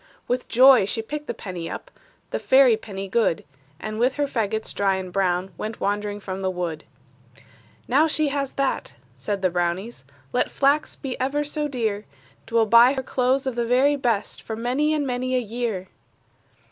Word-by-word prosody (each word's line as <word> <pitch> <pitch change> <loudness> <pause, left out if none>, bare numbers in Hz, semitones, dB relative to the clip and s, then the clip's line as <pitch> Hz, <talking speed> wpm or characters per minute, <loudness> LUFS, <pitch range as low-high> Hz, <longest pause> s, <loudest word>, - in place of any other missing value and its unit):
With 250 +1 -1
joy 255 -3 +7
she 225 +3 -3
picked 295 +5 -6
the - - -2
penny 175 -4 -6
up, - - -7 0.4
The - - -1
fairy 260 -3 +5
penny 195 -3 -7
good; 205 -4 +1 0.4
And 215 +2 -5
with 250 +2 +2
her 290 - +1
fagots 220 -4 -2
dry 195 -1 +1
and 185 -1 -6
brown 185 -1 0
Went 220 +1 -5
wandering 205 0 -1
from 190 -1 -6
the 190 - 0
wood. 175 -4 -4 1.0
"Now 290 +6 +4
she 310 -1 0
has 275 -1 -2
that," 275 -1 -2 0.2
said 200 -2 -4
the 185 - +3
brownies, 175 - -2 0.3
"Let - - +1
flax 280 +2 +1
be 265 -3 -6
ever 275 +3 0
so 295 0 -2
dear, 220 -6 -2 0.4
'T 230 - -6
will 225 -1 +5
buy 235 +4 +7
her 265 -1 -3
clothes 260 +2 +1
of 260 - -1
the 240 0 -1
very 255 +5 +3
best, 235 -7 -1
For 220 - -5
many 255 +7 0
and 300 -2 0
many 255 0 -1
a - - +3
year!" 225 -5 -3
235 Hz, 185 wpm, -24 LUFS, 200-265 Hz, 1.0 s, joy